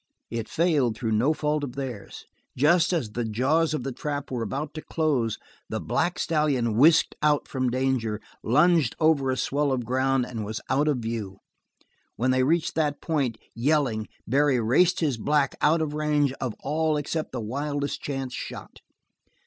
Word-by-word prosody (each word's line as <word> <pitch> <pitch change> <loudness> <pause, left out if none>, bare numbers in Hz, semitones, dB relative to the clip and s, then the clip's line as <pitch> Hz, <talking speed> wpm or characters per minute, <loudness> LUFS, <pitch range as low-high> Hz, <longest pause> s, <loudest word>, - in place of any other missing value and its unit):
It 115 -1 -4
failed 150 -9 +1
through 115 -3 -2
no 115 +7 +3
fault 150 -1 -1
of 130 -3 -5
theirs. 125 -7 -6 0.3
Just 165 +6 +4
as 150 -12 -1
the 120 +2 -2
jaws 140 +9 +1
of 130 - -4
the 135 - -3
trap 145 +2 -4
were 125 -2 -2
about 145 +5 -3
to 155 - -6
close 140 -11 0 0.3
the - - -2
black 175 0 -1
stallion 145 -9 +1
whisked 155 +7 +5
out 150 -1 +2
from 130 -2 -1
danger, 125 -4 0 0.2
lunged 150 +1 +3
over 155 -4 +3
a 130 - 0
swell 145 +2 0
of 125 -3 -1
ground, 130 +1 +1
and 115 -3 -5
was 105 +1 -4
out 145 +3 +2
of 145 -3 +2
view. 110 -4 -4 0.8
When 125 +3 +1
they 130 0 +2
reached 160 +5 +1
that 150 -2 0
point, 140 -8 -1 0.2
yelling, 125 -4 +1 0.2
Barry 140 +1 +2
raced 145 +13 +3
his 145 -7 +1
black 140 +4 +1
out 160 +2 +3
of 150 -1 -3
range 150 -2 +1
of 125 -5 -2
all 155 +1 0
except 155 +2 -3
the 130 - -4
wildest 145 +5 -3
chance 135 -3 -4
shot. - - -7
140 Hz, 175 wpm, -26 LUFS, 120-150 Hz, 0.8 s, whisked